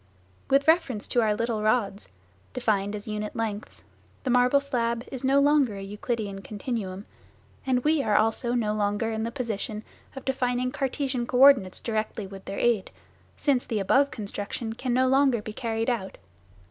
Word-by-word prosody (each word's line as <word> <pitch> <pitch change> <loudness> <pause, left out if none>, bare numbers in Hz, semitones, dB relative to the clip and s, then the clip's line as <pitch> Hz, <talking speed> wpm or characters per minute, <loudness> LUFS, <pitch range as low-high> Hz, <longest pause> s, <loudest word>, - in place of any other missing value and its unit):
With 275 +2 +3
reference 300 -10 +2
to 240 - +3
our 215 -2 +2
little 230 -1 -1
rods 215 -2 0 0.4
defined 210 -4 0
as 205 +1 -7
unit 210 0 -4
lengths 215 -2 -4 0.4
the 260 - 0
marble 250 +3 +4
slab 235 -4 -2
is 260 -2 -5
no 270 +1 +4
longer 280 -6 +3
a 195 - -6
Euclidean 205 0 -4
continuum, 205 -2 -5 0.6
and 250 -1 +2
we 305 -1 +3
are 210 -6 +1
also 225 +3 +2
no 215 -3 0
longer 210 +2 0
in 220 0 -2
the 230 - -3
position 220 -4 -4 0.3
of 270 - -8
defining 250 -1 0
Cartesian 265 -3 -2
co 250 - -1
ordinates 255 -9 +6
directly 220 -2 -3
with 195 0 -11
their 195 - -5
aid, 230 -5 +1 0.5
since 270 -4 +1
the 225 - -1
above 265 +8 +3
construction 210 +1 -5
can 250 +2 -3
no 255 +2 +3
longer 265 -2 +3
be 210 0 -7
carried 225 -1 -2
out. 225 -7 -2
230 Hz, 170 wpm, -26 LUFS, 210-255 Hz, 0.6 s, ordinates